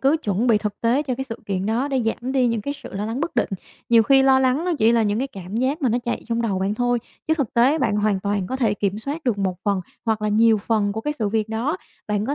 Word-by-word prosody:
cứ 275 Hz, +4 st, +3 dB
chuẩn 205 Hz, +3 st, 0 dB
bị 225 Hz, -3 st, +4 dB
thực 210 Hz, -1 st, -4 dB
tế 240 Hz, +5 st, +2 dB
cho 265 Hz, -4 st, -2 dB
cái 265 Hz, +2 st, -4 dB
sự 230 Hz, -3 st, -7 dB
kiện 195 Hz, -1 st, -2 dB
đó 235 Hz, +6 st, 0 dB
để 265 Hz, -2 st, 0 dB
giảm 235 Hz, +3 st, -2 dB
đi 260 Hz, -2 st, +3 dB
những 230 Hz, -2 st, 0 dB
cái 285 Hz, +7 st, -4 dB
sự -, -, -9 dB
lo 200 Hz, +1 st, -2 dB
lắng 230 Hz, +4 st, -3 dB
bất 340 Hz, -, -3 dB
định. -, -, +2 dB, 0.4 s
Nhiều 230 Hz, -1 st, +6 dB
khi 270 Hz, +3 st, +5 dB
lo 265 Hz, 0 st, +5 dB
lắng 265 Hz, +5 st, +2 dB
nó 360 Hz, -, 0 dB
chỉ 225 Hz, 0 st, +4 dB
là 230 Hz, -1 st, +3 dB
những 205 Hz, 0 st, 0 dB
cái 270 Hz, +3 st, -1 dB
cảm 195 Hz, -1 st, -7 dB
giác 270 Hz, +6 st, 0 dB
mà 260 Hz, -, +3 dB
nó 235 Hz, +2 st, +1 dB
chạy 240 Hz, -, -2 dB
trong 235 Hz, 0 st, 0 dB
đầu 205 Hz, -5 st, 0 dB
bạn 195 Hz, +2 st, 0 dB
thôi, 245 Hz, +1 st, +1 dB, 0.3 s
chứ 315 Hz, -, +4 dB
thực 280 Hz, -8 st, -3 dB
tế 260 Hz, +7 st, +4 dB
bạn 210 Hz, -, +1 dB
hoàn 210 Hz, -2 st, +1 dB
toàn 200 Hz, -1 st, -1 dB
có 260 Hz, -, -3 dB
thể 225 Hz, -6 st, +1 dB
kiểm 205 Hz, 0 st, -1 dB
soát 290 Hz, +7 st, -5 dB
được 235 Hz, -6 st, 0 dB
một 190 Hz, -2 st, -1 dB
phần 200 Hz, -2 st, +1 dB, 0.2 s
hoặc 220 Hz, -2 st, 0 dB
là 215 Hz, -, +1 dB
nhiều 220 Hz, +1 st, +4 dB
phần 205 Hz, -1 st, 0 dB
của 220 Hz, -, -4 dB
cái 295 Hz, +6 st, -2 dB
sự 215 Hz, -3 st, 0 dB
việc 215 Hz, +1 st, -1 dB
đó. 235 Hz, +9 st, -1 dB, 0.3 s
Bạn 210 Hz, 0 st, 0 dB
có 280 Hz, -, 0 dB
230 Hz, 300 wpm, -22 LUFS, 210-260 Hz, 0.4 s, Nhiều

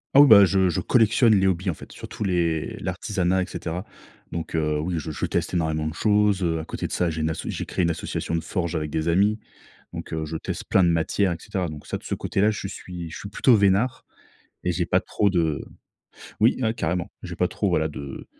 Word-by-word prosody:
Ah 140 Hz, -, +10 dB
oui 145 Hz, -, +8 dB
ben 100 Hz, -5 st, +9 dB
je 95 Hz, -1 st, +2 dB
je 85 Hz, -, -1 dB
collectionne 115 Hz, +3 st, +4 dB
les 95 Hz, -1 st, +4 dB
hobbies 90 Hz, 0 st, 0 dB
en -, -, -4 dB
fait, -, -, -12 dB
surtout -, -, -7 dB
les 85 Hz, -4 st, 0 dB
l'artisanat 95 Hz, -2 st, 0 dB
et 90 Hz, -, -1 dB
cetera. 90 Hz, +2 st, -4 dB, 0.5 s
Donc 85 Hz, -1 st, -5 dB
heu, 75 Hz, -1 st, +1 dB
oui, 85 Hz, +4 st, -2 dB
je 80 Hz, -, -6 dB
je 75 Hz, -, -2 dB
teste -, -, -2 dB
énormément 80 Hz, -2 st, 0 dB
de 80 Hz, -, -4 dB
choses 105 Hz, -2 st, +2 dB
heu. 80 Hz, -2 st, 0 dB
A 80 Hz, -, -5 dB
côté -, -, -5 dB
de -, -, -4 dB
ça, 90 Hz, -2 st, +1 dB
j'ai 80 Hz, 0 st, -3 dB
une 80 Hz, +1 st, 0 dB
asso -, -, -5 dB
j'ai -, -, -3 dB
créé -, -, -2 dB
une 85 Hz, -, +2 dB
association 85 Hz, 0 st, -3 dB
de 80 Hz, -, 0 dB
forge 85 Hz, 0 st, -3 dB
avec 75 Hz, -1 st, -2 dB
des 80 Hz, +2 st, -1 dB
amis, 100 Hz, +6 st, +3 dB, 0.5 s
donc -, -, -7 dB
heu, 80 Hz, -1 st, -2 dB
je 80 Hz, +1 st, -4 dB
teste -, -, -5 dB
plein 95 Hz, -, +4 dB
de 85 Hz, -, +4 dB
matières 85 Hz, +3 st, +1 dB
et 85 Hz, -, -3 dB
cetera. 90 Hz, 0 st, -3 dB
Donc 75 Hz, -2 st, -9 dB
ça -, -, -2 dB
de -, -, -18 dB
ce -, -, -4 dB
côté-là, 105 Hz, +3 st, +1 dB
je 105 Hz, -2 st, -4 dB
suis 90 Hz, -3 st, -7 dB
je 80 Hz, -, -8 dB
suis 100 Hz, -, -7 dB
plutôt 120 Hz, +4 st, +4 dB
veinard 100 Hz, +4 st, +2 dB, 0.6 s
et 90 Hz, -, 0 dB
j'ai 85 Hz, 0 st, -1 dB
pas -, -, +2 dB
trop 100 Hz, -, 0 dB
de 80 Hz, -5 st, 0 dB, 0.8 s
oui, 115 Hz, +4 st, +4 dB
hein, 110 Hz, -2 st, +2 dB
carrément. 85 Hz, -4 st, -2 dB
J'ai -, -, -6 dB
pas -, -, +1 dB
trop -, -, -1 dB
voilà 80 Hz, 0 st, +1 dB
de 70 Hz, -2 st, -8 dB
90 Hz, 240 wpm, -24 LUFS, 80-100 Hz, 0.8 s, Ah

